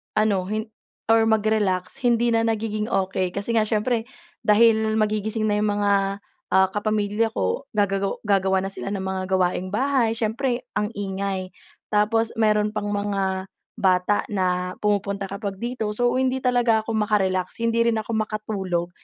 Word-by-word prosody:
ano 210 Hz, -3 st, +2 dB
hin 215 Hz, +2 st, -3 dB, 0.4 s
or 225 Hz, 0 st, +5 dB
mag-relax, 215 Hz, -1 st, +1 dB
hindi 240 Hz, 0 st, +3 dB
na 225 Hz, 0 st, +2 dB
nagiging 215 Hz, -1 st, -1 dB
okey, 190 Hz, -4 st, -1 dB
kasi 200 Hz, +3 st, -4 dB
nga 215 Hz, -, +3 dB
siyempre 225 Hz, +2 st, 0 dB, 0.4 s
dahil 220 Hz, 0 st, +4 dB
magigising 215 Hz, 0 st, 0 dB
na 205 Hz, -, +1 dB
yung 210 Hz, -, +1 dB
mga, 205 Hz, 0 st, +2 dB, 0.6 s
ah, 190 Hz, 0 st, +5 dB
kapamilya 210 Hz, +1 st, 0 dB
ko, -, -, -1 dB
gagago 195 Hz, -1 st, 0 dB
gagawa 190 Hz, -1 st, +3 dB
na 195 Hz, -, -2 dB
sila -, -, -5 dB
ng 195 Hz, -2 st, -3 dB
mga 190 Hz, 0 st, -2 dB
gawaing 180 Hz, 0 st, 0 dB
bahay, 255 Hz, 0 st, +2 dB
siyempre 240 Hz, +3 st, -1 dB, 0.2 s
ang 210 Hz, -, 0 dB
ingay. 195 Hz, -1 st, -3 dB, 0.4 s
Tapos, 220 Hz, +2 st, +2 dB
meron 210 Hz, -1 st, +3 dB
pang 210 Hz, -1 st, -2 dB
mga 195 Hz, -2 st, -1 dB, 0.3 s
bata 185 Hz, +2 st, +2 dB
na 180 Hz, -2 st, -1 dB
pumupunta 200 Hz, -1 st, -1 dB
kapag 200 Hz, 0 st, -4 dB
dito. 240 Hz, -2 st, -3 dB
So, 245 Hz, +2 st, +2 dB
hindi 260 Hz, 0 st, 0 dB
talaga 240 Hz, -3 st, +3 dB
ako 225 Hz, -, -4 dB
maka-relax, 200 Hz, -2 st, 0 dB
hindi 230 Hz, 0 st, +2 dB
rin 230 Hz, -, +2 dB
ako 215 Hz, -, -7 dB
makatulog. 205 Hz, -5 st, -2 dB
210 Hz, 150 wpm, -23 LUFS, 195-225 Hz, 0.6 s, or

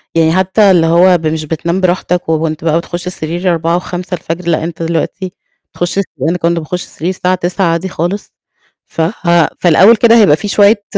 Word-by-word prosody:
يعني 160 Hz, -1 st, +3 dB
حتى 190 Hz, +2 st, +3 dB
اللي 165 Hz, -3 st, +3 dB
هو 175 Hz, +2 st, +4 dB
مش 155 Hz, 0 st, -2 dB
بتنام 170 Hz, +4 st, -2 dB
براحتك، 180 Hz, -1 st, -1 dB
وأنت 160 Hz, 0 st, -1 dB
بقى 160 Hz, 0 st, +1 dB
بتخش 175 Hz, +1 st, -5 dB
السرير 175 Hz, +1 st, -2 dB
4:00 165 Hz, +1 st, 0 dB
و5:00 180 Hz, +1 st, -5 dB
الفجر 170 Hz, 0 st, -5 dB
لأن 160 Hz, -1 st, 0 dB
أنت 165 Hz, 0 st, -5 dB
دلوقتي 170 Hz, +3 st, -3 dB, 0.4 s
تخش 175 Hz, +2 st, -2 dB
أنا 165 Hz, -5 st, -2 dB
ما 180 Hz, -, -2 dB
كنتش 170 Hz, 0 st, 0 dB
باخش 180 Hz, +3 st, -4 dB
السرير 170 Hz, +3 st, -5 dB
الساعة 185 Hz, 0 st, 0 dB
9:00 180 Hz, +2 st, -1 dB
عادى 170 Hz, +3 st, -1 dB
خالص 180 Hz, +4 st, -4 dB, 0.5 s
ف 165 Hz, -, -5 dB, 0.2 s
ها 170 Hz, -2 st, +3 dB
في 175 Hz, -, +2 dB
لأول 200 Hz, +8 st, +6 dB
كده 230 Hz, +1 st, +4 dB
هايبقى 175 Hz, -9 st, +5 dB
في 205 Hz, -, -6 dB
شوية 205 Hz, +1 st, +3 dB
175 Hz, 190 wpm, -13 LUFS, 165-185 Hz, 0.5 s, لأول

